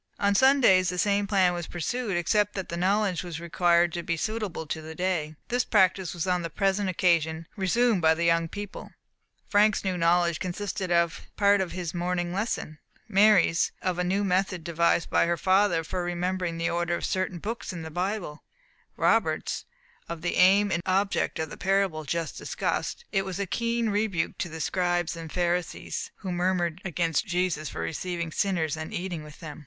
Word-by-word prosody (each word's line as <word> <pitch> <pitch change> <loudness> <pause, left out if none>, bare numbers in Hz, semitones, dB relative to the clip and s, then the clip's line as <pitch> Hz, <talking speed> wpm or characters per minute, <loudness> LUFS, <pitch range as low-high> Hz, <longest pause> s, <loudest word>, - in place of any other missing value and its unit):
On 200 0 +2
Sundays 220 -7 +5
the 180 - -3
same 200 +2 +1
plan 190 -3 +3
was 175 -1 -4
pursued, 195 +4 -2
except 205 +4 +1
that 190 -2 -4
the 170 - -3
knowledge 190 +1 +1
was 175 -3 -6
required 170 0 +2
to 175 - -2
be 170 0 -2
suitable 210 -4 -3
to 160 +1 -4
the 160 +1 -9
day. 170 -4 -1
This 245 +1 +1
practice 190 -3 +2
was 170 - -2
on 180 -1 +1
the 170 - -4
present 195 +2 0
occasion 165 -3 +1
resumed 220 +1 +2
by 160 0 +4
the 170 - -2
young 165 0 +3
people. 205 +3 -8 0.5
Frank's 210 0 +3
new 190 -1 0
knowledge 170 0 +2
consisted 185 0 -3
of 170 -1 +1
part 200 -1 +4
of 185 - -3
his 180 -3 -4
morning 175 0 -2
lesson; 190 -6 -3 0.3
Mary's, 200 -5 +4
of 180 -1 -1
a - - +2
new 190 +3 0
method 185 -2 0
devised 170 0 +1
by - - +3
her 170 0 +1
for 185 -2 +1
remembering 175 0 -2
the 165 0 -1
order 170 0 0
of - - -3
certain 185 -1 -1
books 210 +4 -5
in 170 -3 -6
the 160 - -7
Bible; 180 -3 -3 0.5
Robert's, - - +1 0.4
of 170 -1 -6
the 175 - -1
aim 195 +2 +5
and 175 - 0
object 195 +2 +1
of 160 -1 -3
the - - -8
parable 190 -5 0
just 165 +1 -3
discussed: 475 - -3
it 195 -1 +1
was 190 -1 -5
a 200 - 0
keen 230 +3 -1
rebuke 205 -5 -1
to 175 - -2
the 160 0 -6
Scribes 175 0 0
and 165 -2 -8
Pharisees, 180 - -2
who 190 -3 -6
murmured 175 -1 0
against 170 -4 0
Jesus 175 -5 -1
for - - -6
receiving 170 - -3
sinners 165 -4 0
and 160 0 -6
eating 175 -3 -4
with 150 -1 -13
them. 155 -2 -8
180 Hz, 185 wpm, -27 LUFS, 170-195 Hz, 0.5 s, Sundays